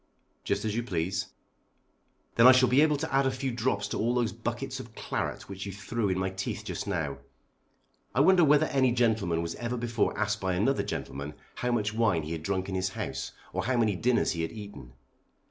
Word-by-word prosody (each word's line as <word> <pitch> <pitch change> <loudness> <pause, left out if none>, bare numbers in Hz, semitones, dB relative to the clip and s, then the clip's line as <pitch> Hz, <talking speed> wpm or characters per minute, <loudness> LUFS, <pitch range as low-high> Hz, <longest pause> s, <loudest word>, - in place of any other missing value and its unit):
"Just - - -1
as 105 -1 -1
you 120 - +1
please." 90 -5 -2 1.1
"Then 115 +2 +7
I 130 - +10
shall 130 -1 +5
be 130 +3 +5
able 150 -1 +4
to 160 0 -4
add 135 0 +4
a - - +1
few 130 +1 -2
drops 115 -4 0
to - - -3
all 120 +3 +1
those 120 -4 +1
buckets 115 +1 -4
of - - -10
claret - - -3
which 100 +1 -6
you - - -4
threw 100 +2 -2
in 95 - 0
my 95 0 -1
teeth 95 +1 -4
just - - -4
now. 75 -8 -2 1.0
I - - +2
wonder 180 +3 +6
whether 150 0 +5
any 130 -4 +2
gentleman 110 -9 +1
was 85 0 -3
ever 120 +1 -3
before 115 -2 0
asked 110 0 0
by 95 -1 0
another 120 +9 +2
gentleman 70 +2 -5 0.2
how 125 - -2
much 105 -3 0
wine 105 -8 +2
he 75 - -6
had 80 -1 -3
drank 95 +2 -1
in 95 - -4
his 95 0 0
house, - - -5 0.2
or - - -2
how 130 +1 +1
many 110 -4 +2
dinners 120 +6 +2
he 85 - -2
had 80 - -2
eaten. 100 - -10
110 Hz, 215 wpm, -29 LUFS, 95-125 Hz, 1.1 s, I